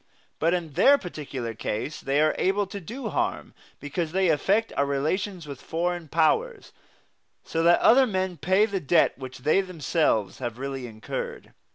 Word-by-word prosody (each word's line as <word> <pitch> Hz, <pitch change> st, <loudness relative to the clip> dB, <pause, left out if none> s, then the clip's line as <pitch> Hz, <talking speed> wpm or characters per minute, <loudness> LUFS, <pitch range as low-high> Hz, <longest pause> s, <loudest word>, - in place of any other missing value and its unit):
But 165 Hz, +3 st, +2 dB
in 165 Hz, -4 st, -5 dB
their 280 Hz, -, +6 dB
particular 140 Hz, -, -6 dB
case 110 Hz, +6 st, -4 dB
they 140 Hz, +2 st, 0 dB
are 155 Hz, 0 st, +3 dB
able 200 Hz, +2 st, +1 dB
to 200 Hz, +1 st, -7 dB
do 230 Hz, -, -6 dB
harm -, -, -2 dB, 0.3 s
because 155 Hz, +3 st, -4 dB
they 190 Hz, -1 st, +2 dB
affect 200 Hz, +8 st, +1 dB
our 140 Hz, -, +2 dB
relations 170 Hz, +6 st, -2 dB
with 140 Hz, -3 st, -9 dB
foreign 175 Hz, 0 st, -2 dB
powers, 305 Hz, -, +1 dB, 0.7 s
so 165 Hz, -, -2 dB
that 170 Hz, +1 st, +5 dB
other 260 Hz, +3 st, +6 dB
men 185 Hz, -4 st, -2 dB
pay 190 Hz, +5 st, +3 dB
the 200 Hz, -3 st, -2 dB
debt 170 Hz, +2 st, +3 dB
which 130 Hz, -1 st, -8 dB
they 155 Hz, +6 st, +4 dB
themselves 155 Hz, -, 0 dB
have 120 Hz, -3 st, -4 dB
really 135 Hz, -1 st, -5 dB
incurred. 110 Hz, -1 st, -6 dB
165 Hz, 165 wpm, -26 LUFS, 140-190 Hz, 0.7 s, their